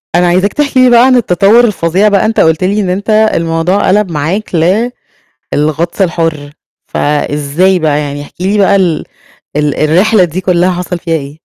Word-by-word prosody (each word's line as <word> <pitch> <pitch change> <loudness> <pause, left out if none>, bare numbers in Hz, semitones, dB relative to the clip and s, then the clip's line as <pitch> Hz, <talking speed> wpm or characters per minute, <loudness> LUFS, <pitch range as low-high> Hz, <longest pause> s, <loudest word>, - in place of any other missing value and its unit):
أنا 175 +1 +2
عايزاك 185 +3 +1
تحكي 285 -3 0
لي 255 - +5
بقى 240 0 +5
عن 260 -1 +3
التطور 210 +1 +3
الفظيع 190 -2 0
بقى 200 -1 +2
أنت 220 +1 -1
قُلت 160 +2 +2
لي 200 +3 0
إن 190 - -2
أنت 195 +4 -3 0.2
الموضوع 165 +4 -1
قَلَب 195 -1 +1
معاك 165 +7 -3 1.0
للغطس 155 +5 -1
الحُر، 165 -5 -2 0.3
فإزاي 150 +5 0
بقى 150 -3 0
يعني، 145 -1 -5
احكِ 145 - -14
لي 195 +3 0
بقى 200 0 +3
ال 180 -5 0 0.5
ال 150 -1 0
الرحلة 185 +7 +2
دي 175 +2 -3
كلها 180 0 +1
حصَل 180 0 -4
فيها 165 -1 -2
ايه؟ 140 +1 -9
180 Hz, 175 wpm, -11 LUFS, 155-200 Hz, 1.0 s, لي